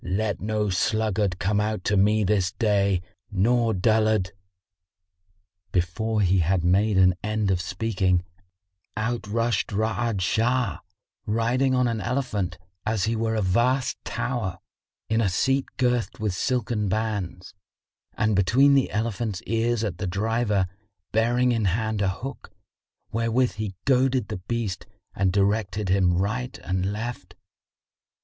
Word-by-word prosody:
Let 100 +1 -1
no 105 0 -1
sluggard 105 0 0
come 100 +3 +1
out 105 -3 -2
to 105 - +1
me 105 +2 +3
this 95 -2 +1
day 100 -4 +1 0.3
nor 115 +4 +2
dullard!" 110 -1 +2 1.4
Before 105 +5 0
he 95 -1 +3
had 85 +1 +1
made 95 +4 +3
an 90 -1 +6
end 105 -2 0
of 90 -2 +1
speaking, 95 -2 0 0.7
out 115 0 -2
rushed 115 +2 0
Ra'ad 110 0 -1
Shah, 115 +1 +1 0.5
riding 125 +5 +1
on 125 -1 +3
an 115 -2 -2
elephant, 105 -7 -2 0.3
as 110 -2 0
he 115 +1 +1
were 110 0 0
a 110 - 0
vast 120 +7 +1
tower, 120 -7 -3 0.5
in 110 +1 +1
a 100 - +2
seat 135 +9 +1
girthed 125 -2 0
with 105 -3 -1
silken 115 -1 -1
bands; 100 -4 -3 0.6
and 110 -1 +2
between 125 +9 +4
the 135 -2 +3
elephant's 110 -2 -2
ears 115 +1 0
sat 100 -6 -3
the 95 - -2
driver, 105 +1 +1 0.5
bearing 120 +3 +2
in 115 -3 0
hand 110 +2 0
a 95 - +2
hook, 130 +8 -6 0.6
wherewith 115 +2 +1
he 105 -3 -5
goaded 130 -4 +2
the - - -3
beast 100 0 -4 0.3
and 95 -2 +1
directed 100 +1 0
him 90 -2 +3
right 110 +7 -2
and 95 0 -1
left. 110 -3 -6
110 Hz, 135 wpm, -25 LUFS, 95-115 Hz, 1.4 s, an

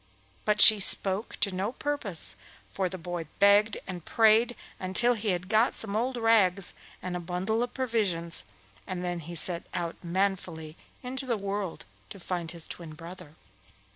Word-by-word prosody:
But 210 0 +1
she 215 -1 +10
spoke 195 +2 +5
to 200 - +2
no 190 +4 -2
purpose, 265 - 0 0.3
for 190 -2 -2
the 185 - -6
boy 175 -1 -6
begged 205 +1 +4
and 180 -3 -7
prayed 225 +4 +3 0.2
until 190 +7 +1
he 220 -2 -5
had 180 -1 -2
got 220 +4 +2
some 205 -2 0
old 245 +3 -1
rags 200 -5 +2 0.3
and 180 -1 -4
a - - -3
bundle 185 +6 -2
of 245 0 -4
provisions, 205 -10 -2 0.4
and 180 -1 -4
then 175 -1 -3
he 170 +2 -9
set 170 +1 -1
out 170 -2 -3
manfully 175 -3 -2 0.3
into 260 +1 -5
the 235 -3 0
world 195 -2 -4 0.2
to 200 - -10
find 175 -2 -4
his 170 -1 -1
twin 165 -3 -8
brother. 170 -1 -12
190 Hz, 165 wpm, -28 LUFS, 175-220 Hz, 0.4 s, she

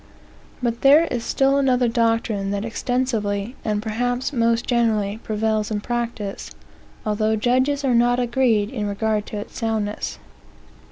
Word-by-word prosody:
But 235 -1 -1
there 290 +4 +6
is 240 -2 -2
still 270 +3 +2
another 255 -3 +3
doctrine 225 -3 0
that 200 +1 -2
extensively, 230 -2 -1
and 210 -1 -1
perhaps 245 +5 -1
most 230 -1 +1
generally, 220 -4 +1
prevails 215 0 -1
in 215 -1 -1
practice, 235 -3 -4 0.6
although 215 +1 +1
judges 260 +6 +1
are 255 - +2
not 240 +1 +3
agreed 235 -4 +1
in 215 -6 -3
regard 210 +1 -1
to 210 - -5
its 205 - -7
soundness. 220 -2 -2
230 Hz, 135 wpm, -22 LUFS, 210-245 Hz, 0.6 s, there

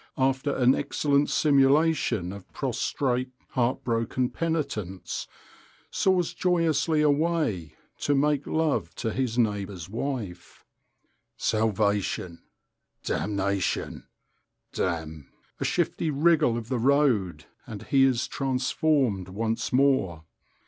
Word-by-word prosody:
after 135 +1 +1
an 125 0 +4
excellent 145 0 +1
simulation 140 - +2
of 100 -2 -12
prostrate, 130 -2 -1 0.2
heart 125 0 0
broken 120 +2 -1
penitence, 140 - -3 0.6
soars 185 -3 +1
joyously 165 -3 +1
away, 145 - 0 0.2
to 145 - +1
make 145 0 +1
love 150 - 0
to 115 -2 -2
his 125 -1 -2
neighbour's 100 -6 -1
wife. 110 -5 -5 0.7
"Salvation, 105 -5 0 0.6
damnation, 100 -2 -2 0.7
damn—" 80 -5 -3 0.3
A - - -2
shifty 165 - 0
wriggle 150 -5 +3
of 115 -2 -6
the 125 -1 -1
road, 115 - +2 0.2
and 105 -2 -7
he 135 -1 +3
is 130 -2 +2
transformed 130 - 0
once 115 +3 -2
more. 125 - +2
125 Hz, 100 wpm, -26 LUFS, 100-145 Hz, 0.7 s, an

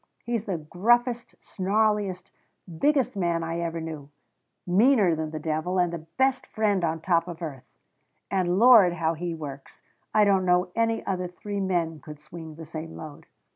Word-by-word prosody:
He's 235 -2 -2
the 190 -4 -2
gruffest, 235 +9 +1
snarliest, 205 -1 0 0.5
biggest 285 - +2
man 170 -3 0
I 165 +1 -3
ever 170 -1 -3
knew 155 -3 -7 0.6
meaner 205 0 +4
than 160 0 -3
the 155 - -6
devil, 160 +4 -2
and 175 -1 +1
the 165 -1 -7
best 265 0 +1
friend 205 -4 0
on 160 -1 -1
top 170 0 +1
of 170 -2 -7
earth. 135 -5 -7 0.6
And 185 -2 +1
Lord, 220 -6 +7
how 165 -1 0
he 170 +1 -4
works! 140 -3 -9 0.3
I 210 -1 +4
don't 195 -2 +3
know 180 0 +2
any 225 0 0
other 185 -2 -2
three 200 +3 -6
men 170 -5 -1
could 150 0 -11
swing 160 +1 -10
the 160 +1 -9
same 160 +1 -7
load. 155 -2 -10
175 Hz, 170 wpm, -26 LUFS, 160-205 Hz, 0.6 s, Lord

